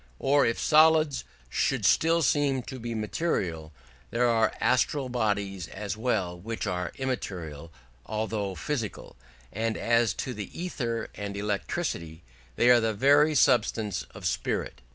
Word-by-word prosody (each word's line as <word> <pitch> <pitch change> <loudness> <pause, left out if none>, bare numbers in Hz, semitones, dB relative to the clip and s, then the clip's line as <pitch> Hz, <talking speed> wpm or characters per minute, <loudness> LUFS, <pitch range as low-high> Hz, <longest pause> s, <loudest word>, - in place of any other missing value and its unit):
Or 140 - +3
if 115 - 0
solids 155 -2 +4 0.2
should 115 - 0
still 165 - +4
seem 135 -1 +2
to 130 0 -8
be 115 0 -4
material, 95 - -2 0.4
there 120 +3 +2
are 115 -2 +3
astral 130 +1 +1
bodies 100 -7 -1
as 100 +1 -5
well 105 -7 -1
which 115 +5 -4
are 90 0 -2
immaterial 85 - -4 0.4
although 110 -3 -2
physical; 115 -1 -4 0.4
and 110 +1 -1
as 115 -3 +2
to 130 - -4
ether 115 - -4
and 100 -1 -5
electricity, 100 - -3 0.3
they 120 - +5
are 120 - +7
the 110 -1 0
very 145 +6 +4
substance 110 -7 +2
of - - -10
spirit. 65 - -2
115 Hz, 130 wpm, -27 LUFS, 100-130 Hz, 0.4 s, are